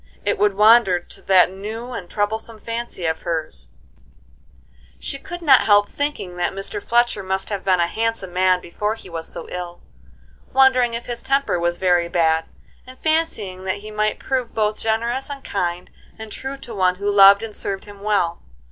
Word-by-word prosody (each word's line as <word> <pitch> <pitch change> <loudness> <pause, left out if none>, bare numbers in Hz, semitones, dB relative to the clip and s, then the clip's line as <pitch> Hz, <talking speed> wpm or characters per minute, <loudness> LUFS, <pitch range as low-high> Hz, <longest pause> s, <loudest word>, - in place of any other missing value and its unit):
It - - 0
would 205 -1 +2
wander 210 -3 +5
to - - -11
that 185 -1 +4
new 220 +6 -7
and 185 -7 -7
troublesome 220 +2 -2
fancy 230 -5 -5
of 160 0 -1
hers; 155 - -4 1.3
she 275 - -6
could 350 +4 -8
not 270 -5 +5
help 205 -1 +5
thinking 285 -11 -3
that 175 - -1
Mr. 195 +1 -3
Fletcher 240 0 +1
must 190 0 -3
have 200 -2 -3
been 185 -2 +2
a 170 - +3
handsome 220 -1 -3
man 185 0 +3
before 210 +5 -3
he 190 -5 -13
was 165 -1 -5
so - - -7
ill; 175 -1 -7 0.7
wondering 255 -3 +4
if 235 - -5
his 240 -1 -5
temper 275 -9 0
was 175 0 0
very 175 -2 +2
bad, 160 -2 +2 0.4
and 255 0 -12
fancying 270 - -1
that 190 +2 -2
he 215 - -7
might 215 0 0
prove 255 -3 -3
both 215 -1 0
generous 235 +5 -1
and 280 -1 -7
kind 180 -2 -3 0.3
and 220 -1 -9
true 270 +4 -5
to 245 -4 -10
one 185 -3 +2
who 200 +2 -5
loved 200 +1 +7
and 220 -2 -6
served 195 -1 -4
him 205 -1 -13
well. 200 -5 0
205 Hz, 185 wpm, -21 LUFS, 180-235 Hz, 1.3 s, loved